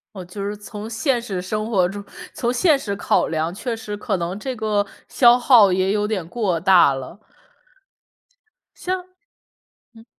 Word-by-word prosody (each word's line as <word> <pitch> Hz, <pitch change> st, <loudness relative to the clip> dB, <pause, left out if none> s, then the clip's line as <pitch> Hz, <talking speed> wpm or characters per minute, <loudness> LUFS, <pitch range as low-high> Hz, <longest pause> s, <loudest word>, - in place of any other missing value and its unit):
哦， 185 Hz, -, -7 dB
就 195 Hz, +3 st, -6 dB
是 205 Hz, +1 st, -3 dB
从 210 Hz, +1 st, -8 dB
现 240 Hz, +2 st, 0 dB
实 195 Hz, -6 st, -4 dB
生 215 Hz, +4 st, -3 dB
活 185 Hz, -5 st, +3 dB
中 200 Hz, +2 st, -7 dB, 0.3 s
从 240 Hz, -, -1 dB
现 290 Hz, +4 st, +3 dB
实 205 Hz, -7 st, -4 dB
考 -, -, +1 dB
量， 160 Hz, +1 st, -2 dB
确 235 Hz, +5 st, -4 dB
实 220 Hz, -2 st, -6 dB
可 205 Hz, -1 st, -2 dB
能 175 Hz, +3 st, -4 dB
这 260 Hz, +4 st, -4 dB
个 210 Hz, -2 st, 0 dB, 0.2 s
消 240 Hz, -1 st, +5 dB
耗 235 Hz, -6 st, +6 dB
也 185 Hz, +1 st, +1 dB
有 210 Hz, 0 st, 0 dB
点 200 Hz, -6 st, -3 dB
过 185 Hz, -4 st, -1 dB
大 180 Hz, -5 st, +5 dB
了。 135 Hz, +7 st, -7 dB, 1.6 s
像 365 Hz, 0 st, -3 dB, 0.9 s
嗯。 225 Hz, 0 st, -16 dB
205 Hz, 175 characters per minute, -21 LUFS, 185-230 Hz, 1.6 s, 耗